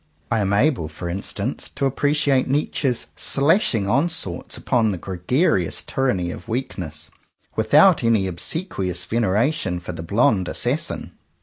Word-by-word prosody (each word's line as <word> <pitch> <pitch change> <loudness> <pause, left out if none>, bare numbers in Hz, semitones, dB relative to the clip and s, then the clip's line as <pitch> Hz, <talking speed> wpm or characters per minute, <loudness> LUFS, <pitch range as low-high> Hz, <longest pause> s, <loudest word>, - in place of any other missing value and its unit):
I 115 - +2
am 100 -1 0
able, 105 - +2
for 85 +3 -7
instance, 100 +6 -4
to 140 - +1
appre 145 +2 0
ciate 145 -3 +2
Nietzsche's 135 -2 0
slashing 140 - +2
onslaughts 140 - 0
upon 115 -3 +1
the 95 - -2
gregarious 95 - 0
tyranny 95 -10 -1
of - - -9
weakness, 90 - -4 0.4
without - - +5
any 115 -4 +3
obsequious 90 - -2
veneration 110 - 0
for 90 +1 -7
the 85 - -7
blond 100 - +2
assassin. - - -2
110 Hz, 130 wpm, -22 LUFS, 90-135 Hz, 0.4 s, without